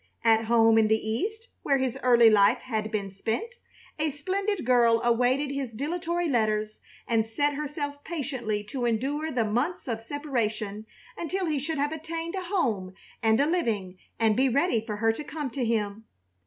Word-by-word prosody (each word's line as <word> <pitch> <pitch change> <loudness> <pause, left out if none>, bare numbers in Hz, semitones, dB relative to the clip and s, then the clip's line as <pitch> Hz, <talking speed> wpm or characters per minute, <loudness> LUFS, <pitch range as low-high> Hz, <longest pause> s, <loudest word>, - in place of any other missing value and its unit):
At 225 -1 +4
home 225 -1 +5
in 220 - +4
the 220 0 +3
East, 425 - -2
where 275 - +2
his 260 -2 -1
early 235 -3 +6
life 200 -1 +5
had 220 -3 -3
been 200 -3 -3
spent, 230 - -3 0.4
a 310 0 +1
splendid 380 - -2
girl 235 -2 +4
awaited 250 +4 +2
his 270 -4 -4
dilatory 340 +7 -2
letters 215 -5 0 0.3
and 225 -1 +2
set 285 +7 0
herself 285 0 -4
patiently 255 -10 -3
to 245 +3 -4
endure 275 +7 -1
the 245 -6 0
months 250 +13 -1
of 225 -2 -2
separation 225 -6 -3 0.3
until 370 +3 -2
he 305 -4 0
should 310 +3 -3
have 290 +1 0
attained 330 +1 -5
a 380 - -2
home 225 - -1 0.3
and 220 0 +3
a 285 - +4
living 215 - -1 0.2
and 220 -2 +3
be 265 +3 +3
ready 265 -3 +2
for 220 -2 -4
her 225 +2 +2
to 300 - -6
come 295 -2 -5
to 255 +2 -2
him. 220 -2 -1
250 Hz, 175 wpm, -27 LUFS, 220-300 Hz, 0.4 s, early